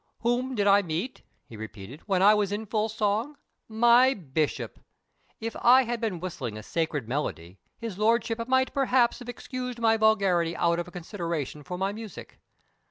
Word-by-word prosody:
"Whom 245 Hz, +2 st, 0 dB
did 205 Hz, -3 st, +1 dB
I 200 Hz, 0 st, +6 dB
meet," 175 Hz, +7 st, -4 dB, 0.2 s
he 115 Hz, -, -12 dB
repeated, 110 Hz, +5 st, -9 dB
"when 190 Hz, -2 st, +2 dB
I 205 Hz, +2 st, +8 dB
was 205 Hz, -2 st, +1 dB
in 210 Hz, +2 st, -3 dB
full 215 Hz, +1 st, -1 dB
song? 220 Hz, +6 st, -1 dB, 0.3 s
My 240 Hz, +4 st, +5 dB
bishop! 155 Hz, -3 st, -3 dB, 0.6 s
If 225 Hz, 0 st, -5 dB
I 255 Hz, +2 st, +7 dB
had 240 Hz, -1 st, -3 dB
been 210 Hz, -7 st, -2 dB
whistling 135 Hz, -11 st, -5 dB
a 110 Hz, -, -8 dB
sacred 155 Hz, -4 st, -2 dB
melody, 95 Hz, -, -4 dB, 0.2 s
his 220 Hz, -4 st, -6 dB
lordship 230 Hz, +1 st, +1 dB
might 260 Hz, 0 st, +2 dB
perhaps 260 Hz, -3 st, +2 dB
have 245 Hz, -1 st, -9 dB
excused 250 Hz, 0 st, -5 dB
my 225 Hz, -1 st, +3 dB
vulgarity 195 Hz, -6 st, +2 dB
out 170 Hz, 0 st, +2 dB
of 175 Hz, +1 st, -5 dB
consideration 170 Hz, -, -4 dB
for 180 Hz, +5 st, -6 dB
my 195 Hz, +2 st, -1 dB
music. 215 Hz, 0 st, -9 dB
205 Hz, 165 wpm, -27 LUFS, 170-235 Hz, 0.6 s, I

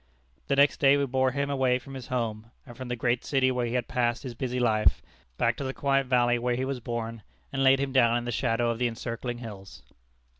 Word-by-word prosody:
The 140 Hz, -, +1 dB
next 140 Hz, +1 st, +4 dB
day 140 Hz, 0 st, +5 dB
we 140 Hz, -, +1 dB
bore 130 Hz, 0 st, +1 dB
him 140 Hz, +2 st, -2 dB
away 130 Hz, -2 st, +2 dB
from 135 Hz, +2 st, -11 dB
his 130 Hz, -2 st, -8 dB
home, 115 Hz, -3 st, -3 dB, 0.2 s
and 120 Hz, -3 st, -12 dB
from 130 Hz, +1 st, -7 dB
the 125 Hz, -, -2 dB
great 120 Hz, +1 st, 0 dB
city 130 Hz, -2 st, +2 dB
where 125 Hz, -1 st, -1 dB
he 120 Hz, -, -3 dB
had 125 Hz, -1 st, -1 dB
passed 120 Hz, -1 st, 0 dB
his 125 Hz, -3 st, -6 dB
busy 125 Hz, +1 st, -3 dB
life, 110 Hz, -3 st, +2 dB, 0.3 s
back 115 Hz, 0 st, +2 dB
to -, -, -4 dB
the 130 Hz, 0 st, -4 dB
quiet 135 Hz, -1 st, +1 dB
valley 120 Hz, -1 st, +3 dB
where 120 Hz, 0 st, 0 dB
he 130 Hz, +2 st, -2 dB
was 135 Hz, -1 st, -3 dB
born, 115 Hz, -1 st, -5 dB, 0.3 s
and 135 Hz, -, 0 dB
laid 135 Hz, 0 st, +5 dB
him 140 Hz, -1 st, -1 dB
down 120 Hz, -3 st, +4 dB
in 120 Hz, -, -4 dB
the 120 Hz, -, -2 dB
shadow 115 Hz, 0 st, 0 dB
of 115 Hz, -, -5 dB
the 125 Hz, -, +2 dB
encircling 120 Hz, +1 st, -5 dB
hills. 95 Hz, -, -10 dB
125 Hz, 240 wpm, -27 LUFS, 115-130 Hz, 0.3 s, day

